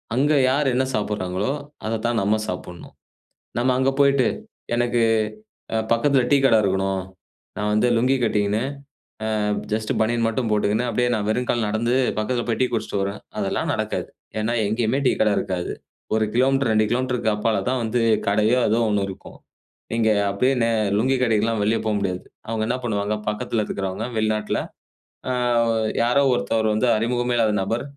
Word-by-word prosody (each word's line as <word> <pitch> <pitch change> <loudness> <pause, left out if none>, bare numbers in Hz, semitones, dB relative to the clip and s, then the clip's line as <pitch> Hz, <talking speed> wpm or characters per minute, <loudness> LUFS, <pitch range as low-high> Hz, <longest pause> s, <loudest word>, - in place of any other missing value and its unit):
அங்க 145 +4 +3 0.2
யார் 140 +2 +1
என்ன 130 +2 +2
சாப்பிடுறாங்களோ, 105 0 -2 0.3
அத 110 0 -1
தான் 120 -1 +1
நம்ம 100 +2 +2
சாப்டணும். 90 -1 -7 0.6
நம்ம 125 +2 +2
அங்க 130 +1 +3
போயிட்டு, 140 -3 +4 0.5
எனக்கு 120 0 +1 0.7
அ - - +1
பக்கத்தில 135 +3 +3
டீ 145 - +6
கட 135 - +5
இருக்கணும். 95 -1 0 0.5
நான் 105 0 -1
வந்து 105 +3 +3
லுங்கி 130 +3 +3
கட்டிக்கின்னு, 105 -1 +1 0.8
அ - - 0 0.3
ஜஸ்ட் 110 0 -1
பனியன் 115 +1 +1
மட்டும் 115 +1 -1
போட்டுகின்னு, 105 +2 +1
அப்டியே 125 +1 +1
நான் 105 -1 -2
வெறும் 125 +3 0
கால்ல 115 -3 +1
நடந்து, 115 +3 0 0.2
பக்கத்தில 120 +3 -1
போய் 115 - 0
டீ - - +5
குடிச்சிட்டு 110 -3 -1
வரேன் 100 +2 -3 0.2
அதெல்லாம் - - -1
நடக்காது. - - -3 0.3
ஏன்னா, 115 +2 0
எங்கேயுமே 115 +4 0
டீ - - +3
கட 110 - +4
இருக்காது 90 -2 -3 0.4
1 110 0 +2
கிலோமீட்டர், 135 0 +2
2 110 0 +3
கிலோமீட்டருக்கு 125 -3 0
அப்பால 105 -1 0
தான் 130 -1 0
வந்து 115 +2 0 0.3
கடையோ 105 +5 +3
ஏதோ 110 +2 +2
ஒண்ணு 105 -1 +1
இருக்கும். 95 - -11 0.6
இங்க 115 -1 +2 0.2
அப்டியே 125 +7 +2
நே 115 - +2 0.3
லுங்கி 130 +5 +2
கட்டிக்கிட்டுலாம் 115 -2 +1
வெளிய 110 +2 +2
போ - - +1
முடியாது. 90 -2 -2 0.3
அவங்க 110 -1 -2
என்ன 120 - 0
பண்ணுவாங்க? 105 -2 -1
பக்கத்தில 110 +1 -1
இருக்கிறவங்க 95 +2 -3
வெளிநாட்டில. 110 -1 0 0.7
"ஆ - - +1 0.7
யாரோ 125 +4 +3
ஒருத்தவர் 110 -2 0
வந்து 110 +4 +1
அறிமுகமே 120 +2 0
இல்லாத 115 -2 +3
நபர், 115 +5 -1
110 Hz, 160 wpm, -22 LUFS, 105-125 Hz, 0.8 s, டீ